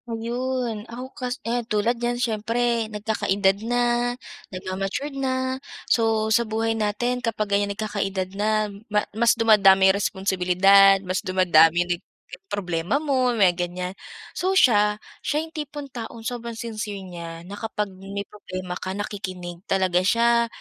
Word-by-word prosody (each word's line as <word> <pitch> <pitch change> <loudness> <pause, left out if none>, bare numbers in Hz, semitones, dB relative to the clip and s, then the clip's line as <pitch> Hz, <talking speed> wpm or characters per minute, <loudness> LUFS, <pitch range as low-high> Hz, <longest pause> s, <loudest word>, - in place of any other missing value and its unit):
Ayun. 235 0 -2
Ako 250 +3 -8
kas 250 0 -4
ayan, 240 +1 0
tulad 215 +2 +2
niyan 240 0 0
siyempre 230 0 0
nagkakaedad 205 -2 +1
na, 245 0 +2 0.7
nagma-matured 195 +9 -4
na, 260 -1 -2 0.2
so, 225 -2 +2
sa 235 - +4
buhay 225 0 -1
natin 225 +3 -1
kapag 215 -3 -2
ganiyan 200 0 +2
nagkakaedad 195 -3 -2
na 215 +1 +1 0.2
ma 210 0 +1
mas 230 +2 +3
dumadami 195 -4 +6
responsibilidad, 195 0 +4
mas 185 +1 -1
dumadami 175 -3 +4
nag 175 -1 -2 0.5
problema 180 - -2
mo, 265 -4 +1
may 195 -5 +5
ganiyan. 180 +1 -4 0.4
So 375 +1 -1
siya, 210 - +5 0.2
siya 300 +2 -1
'yong 320 - -10
tipong 295 -2 -6
taong 230 -1 -7
sobrang 235 0 -4
sincere 215 -3 -5
niya 170 -2 -8
na 200 +3 -9
kapag 210 -3 -3
may 195 +2 -6
problema 185 -3 -7
ka 185 +1 -4
nakikinig 185 -4 -5
talaga 185 -2 +2
siya, 235 +5 +3
210 Hz, 135 wpm, -24 LUFS, 190-235 Hz, 0.7 s, dumadami